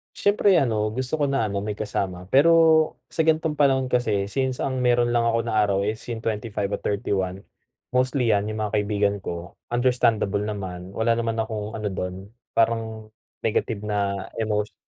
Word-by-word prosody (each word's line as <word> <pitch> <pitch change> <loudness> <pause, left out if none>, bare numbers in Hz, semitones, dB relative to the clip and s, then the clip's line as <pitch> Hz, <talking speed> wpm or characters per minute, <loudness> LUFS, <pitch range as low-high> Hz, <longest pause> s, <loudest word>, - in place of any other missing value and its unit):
Siyempre 205 -2 +3
ano, 110 -6 +1
gusto 130 +6 -3
ko - - +4
na 135 -5 +1
ano 100 -1 -2
may 105 0 -4
kasama, 90 -4 -3
pero 160 +1 +5 0.2
sa 160 - +2
gan'tong 160 -1 +2
panahon 135 -3 +3
kasi 110 -6 +1
since 130 +4 -1
ang 130 -2 -2
meron 120 -1 +3
lang 120 - +3
ako 115 0 +2
na 115 - -2
araw 100 -1 +1
is 110 +1 -2
yung 115 - -2
25 105 -2 -2
at - - -3
31. 95 -1 -2 0.5
Mostly 125 -1 +2
yan 105 +1 0
yung 110 0 -3
mga 105 - -5
kaibigan 105 -1 +1
ko, 85 -1 -6 0.2
understandable 115 -5 +2
naman, 95 -3 -5
wala 115 +2 +2
naman 115 -1 -1
akong 110 -1 -3
ano 105 -1 -3
do'n 90 0 -3 0.4
parang 110 -1 0 0.4
negative 105 -1 -1
na 100 -2 -1
emotio 105 -2 -1
110 Hz, 170 wpm, -24 LUFS, 100-125 Hz, 0.5 s, pero